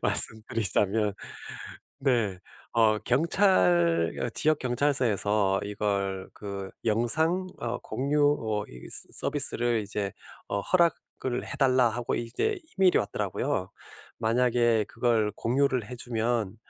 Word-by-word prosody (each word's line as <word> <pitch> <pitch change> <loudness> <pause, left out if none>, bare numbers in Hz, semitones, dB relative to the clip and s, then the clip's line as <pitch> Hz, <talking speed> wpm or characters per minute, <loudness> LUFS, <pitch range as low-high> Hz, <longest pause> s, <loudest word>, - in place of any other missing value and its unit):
말씀드리자면 105 -1 +3 0.8
네. 115 -8 0 0.3
어 110 -2 +3
경찰 90 - +2
어 120 - -2
지역 155 +5 +1
경찰서에서 110 -7 +1
이걸 100 -2 -3
그 100 -2 -7 0.2
"영상 160 - +2
어 120 +1 -3
공유 145 +3 -1 0.2
어 105 -2 -2
이 60 - -12
서 - - +1
서비스를 120 -5 +2
이제 100 -1 -3 0.4
어 100 - -1
허락을 165 - -1
해달라." 130 -3 +2
하고 120 +1 -3
이제 250 - -2 0.2
이메일이 190 -2 +4
왔더라고요. 100 - -2 0.5
만약에 120 -1 +2
그걸 115 -3 0
공유를 130 -1 0
해 125 - -6
주면 115 -3 -2
115 Hz, 235 characters per minute, -27 LUFS, 105-130 Hz, 0.8 s, 이메일이